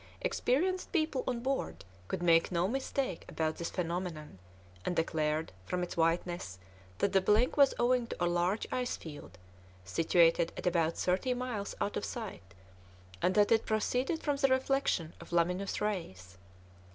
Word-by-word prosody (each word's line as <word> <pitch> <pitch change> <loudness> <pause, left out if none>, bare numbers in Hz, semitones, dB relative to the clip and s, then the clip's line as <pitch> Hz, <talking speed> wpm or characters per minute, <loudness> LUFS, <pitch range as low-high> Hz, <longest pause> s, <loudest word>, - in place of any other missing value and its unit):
Experienced 370 - 0
people 310 -6 0
on 245 -2 -1
board 265 - -2 0.2
could 175 - -3
make 165 0 +4
no 175 +1 +1
mistake 260 -4 -2
about 160 -1 -1
this 170 - -3
phenomenon, 170 - -4 0.4
and 180 - -1
declared, 155 -1 0 0.2
from 180 0 -1
its 175 - -5
whiteness, 165 - 0 0.4
that 200 - +1
the 195 - +5
blink 215 +6 +3
was 280 -2 +5
owing 245 0 +2
to - - -5
a 175 - +2
large 175 +4 +1
ice 250 -1 -1
field, 145 - -10 0.5
situated 165 - +3
at - - -6
about 170 -2 +1
thirty 195 +8 +1
miles 245 -5 -4
out 205 - -1
of - - -2
sight, 190 - -6 0.7
and 185 - +2
that 210 +1 +4
it 225 -1 +3
proceeded 250 +8 0
from 290 -2 +1
the 275 - +3
reflection 260 - +1
of - - -12
luminous 180 +3 +1
rays. 95 - -4
185 Hz, 155 wpm, -32 LUFS, 165-250 Hz, 0.7 s, the